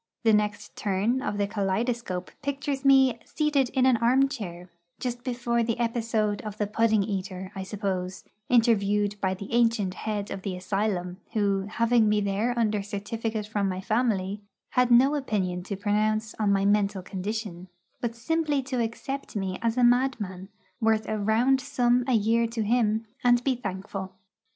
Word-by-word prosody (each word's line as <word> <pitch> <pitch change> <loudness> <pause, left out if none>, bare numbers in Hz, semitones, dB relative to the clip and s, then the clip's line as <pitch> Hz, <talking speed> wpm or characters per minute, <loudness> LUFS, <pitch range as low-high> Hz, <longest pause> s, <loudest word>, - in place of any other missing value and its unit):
The 225 -1 +5
next 210 0 0
turn 210 +6 0
of 205 - -2
the 205 - +1
kaleidoscope 200 -1 -2
pictures 280 -1 -3
me 265 -3 +5
seated 295 -4 +1
in 260 -1 +2
an 255 -2 +5
armchair, 235 -8 0 0.3
just 245 -1 -4
before 240 -1 0
the 230 -1 0
episode 225 -3 0
of 210 -1 -7
the 210 - 0
pudding 220 0 +2
eater, 190 -2 -4
I 195 - -5
suppose, 190 -2 -3 0.3
interviewed 210 -4 +2
by 190 -1 +1
the 200 +4 -8
ancient 230 -5 +2
head 205 0 -4
of 195 - -5
the 190 -1 -3
asylum, 185 -1 -2 0.2
who, 200 -2 +1
having 230 0 +3
me 210 0 +3
there 205 +4 0
under 215 -3 +1
certificate 215 +2 -4
from 205 -2 -1
my 185 0 -3
family, 210 -2 0 0.3
had 250 -1 +3
no 255 +4 +6
opinion 200 -11 -1
to 200 - -3
pronounce 215 +2 0
on 210 -2 +2
my 195 0 +2
mental 200 -1 +2
condition, 195 -1 -5 0.3
but 235 -1 -3
simply 295 +2 0
to 255 -2 -2
accept 270 +5 -5
me 190 -2 -2
as 230 +1 0
a 250 - +3
madman, 235 -7 +1 0.3
worth 220 -1 +2
a 215 -1 -2
round 235 +6 +3
sum 250 -2 +2
a 260 - +2
year 230 +1 +3
to 230 -1 -2
him, 220 0 +1 0.2
and 245 0 +4
be 270 - +2
thankful. 190 -3 -5
215 Hz, 165 wpm, -27 LUFS, 200-240 Hz, 0.3 s, no